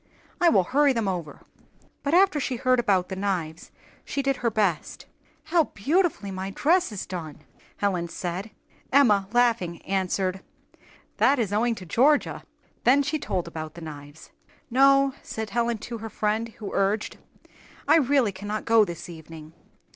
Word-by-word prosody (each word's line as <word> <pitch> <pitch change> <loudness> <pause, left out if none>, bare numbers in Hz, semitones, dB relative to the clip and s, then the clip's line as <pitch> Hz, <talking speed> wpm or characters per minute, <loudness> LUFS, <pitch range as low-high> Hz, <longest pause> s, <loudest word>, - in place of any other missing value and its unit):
"I 350 - +5
will 195 - +4
hurry 280 +7 +3
them 230 -4 -1
over." 175 -5 -4 0.6
But 290 +3 +1
after 375 -4 +4
she 260 -2 -2
heard 255 +1 +2
about 190 -6 +1
the 190 - -4
knives, 180 -5 -3 0.3
she 280 - -3
did 275 -1 0
her 235 - 0
best. 200 -7 -1 0.4
"How 330 -2 +2
beautifully 285 - 0
my 190 0 -4
dress 325 - +2
is 205 - -5
done!" 160 -5 -7 0.4
Helen 185 -4 -1
said. 175 +4 -5 0.4
Emma, 210 -8 +4
laughing, 230 -8 +1
answered, 190 0 -1 0.8
"That 280 +2 +4
is 215 -5 -1
owing 230 +2 +1
to 185 - -10
Georgia." 275 - +2 0.4
Then 275 +3 +5
she 300 +2 -2
told 180 -9 -3
about 155 -2 -7
the 170 - -10
knives. 145 -1 -10 0.4
"No," 275 +1 +5
said 220 -2 -6
Helen 235 0 0
to 235 -2 -6
her 225 +1 -6
friend 215 +2 -1
who 215 -2 -8
urged, 200 +2 0 0.7
"I - - +6
really 275 -6 +2
cannot 205 +3 -5
go 225 -1 +5
this 170 -3 -6
evening. 160 -2 -11
210 Hz, 155 wpm, -25 LUFS, 185-260 Hz, 0.8 s, I